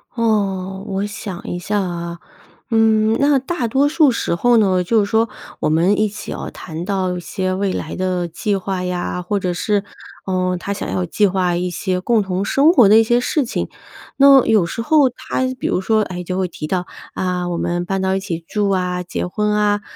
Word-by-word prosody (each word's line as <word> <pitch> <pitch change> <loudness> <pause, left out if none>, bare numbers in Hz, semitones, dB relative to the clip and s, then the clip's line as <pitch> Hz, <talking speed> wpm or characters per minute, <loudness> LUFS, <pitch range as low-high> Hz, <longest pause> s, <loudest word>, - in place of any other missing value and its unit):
哦， 195 -4 -1
我 195 +1 -2
想 205 -3 -7
一 175 - -4
下 205 +3 -1
啊。 170 -1 -5 0.5
嗯， 220 -1 +3
那 280 -1 +4
大 265 -2 -2
多 270 +5 +2
数 300 -4 +4
时 230 - -1
候 240 +6 +3
呢， 185 -4 +3
就 220 +5 +2
是 200 - -4
说 225 +1 +2 0.3
我 - - 0
们 175 +7 +2
一 215 - +3
起 210 +1 -8
哦， - - -5
谈 165 0 -7
到 185 -2 -1
一 - - -4
些 185 +2 -3
未 195 0 -1
来 155 - -4
的 185 -2 -1
计 200 +5 -2
划 190 -1 -3
呀， 180 0 -3
或 200 +3 -1
者 180 -1 -1
是， 205 +1 0 0.4
呃， 185 -1 0
他 200 - -5
想 200 - -3
要 180 - -1
计 205 +4 +1
划 185 -2 +1
一 180 0 -2
些 185 +1 -2
共 225 +3 +2
同 190 0 -2
生 285 +9 +4
活 245 - +6
的 215 +2 +7
一 - - +5
些 240 +2 +2
事 275 +3 0
情。 245 - -3 0.5
那 275 -2 +7
有 215 -6 +3
时 230 +6 -4
候 295 -2 +4
他 255 +1 -3
比 - - -5
如 185 - +1
说， 215 +2 +2
哎， 180 -3 -5
就 185 +1 -3
会 190 - 0
提 160 -3 -7
到， 180 +1 -1 0.3
“啊， 180 -1 -1
我 170 - -2
们 175 +1 -1
搬 195 +1 -2
到 190 0 +1
一 - - 0
起 170 -4 -5
住 205 -2 0
啊、 180 -2 0
结 180 - -4
婚 210 +4 -1
啊”， 205 0 +2
195 Hz, 230 characters per minute, -19 LUFS, 180-220 Hz, 0.5 s, 的